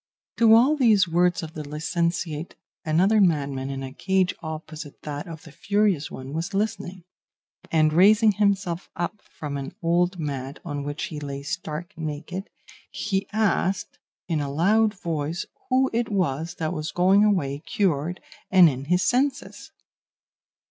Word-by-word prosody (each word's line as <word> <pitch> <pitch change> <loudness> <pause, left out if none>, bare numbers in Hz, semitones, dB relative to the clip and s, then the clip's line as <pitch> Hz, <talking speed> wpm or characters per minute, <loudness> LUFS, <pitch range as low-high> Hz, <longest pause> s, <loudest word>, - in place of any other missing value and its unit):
"To 225 -1 +7
all 260 +7 +5
these 220 -9 +4
words 175 +1 +2
of 160 0 -7
the 155 - -6
licentiate 165 +2 -2 0.3
another 185 +7 +3
madman 140 -7 +1
in 135 0 -4
a 130 0 -7
cage 190 +3 +1
opposite 155 -2 -7
that 145 +1 -5
of 165 -2 -9
the 160 - -13
furious 200 -3 +1
one 130 +1 -8
was 165 +5 -3
listening; 195 -3 -2 0.7
and 155 -1 +3
raising 210 +5 +6
himself 195 -3 0
up 175 +5 -4
from 145 -2 -7
an 135 0 -6
old 175 +2 +2
mat 140 -3 -4
on 145 -3 -4
which 145 +2 -4
he 150 - -4
lay 140 -1 -6
stark 155 +5 -5
naked, 160 +4 -5 0.4
he 195 -1 -2
asked 200 -2 0 0.3
in 160 -4 0
a 140 -1 -3
loud 210 +8 +3
voice 165 0 -3 0.2
who 265 +1 +3
it 230 0 0
was 165 -4 -1
that 160 +1 -2
was 155 -2 -3
going 190 +3 +4
away 145 -10 +1
cured 170 -1 -1 0.3
and 185 -3 +7
in 130 +1 -6
his 180 +4 +2
senses. 270 +2 -1
170 Hz, 150 wpm, -25 LUFS, 150-195 Hz, 0.7 s, To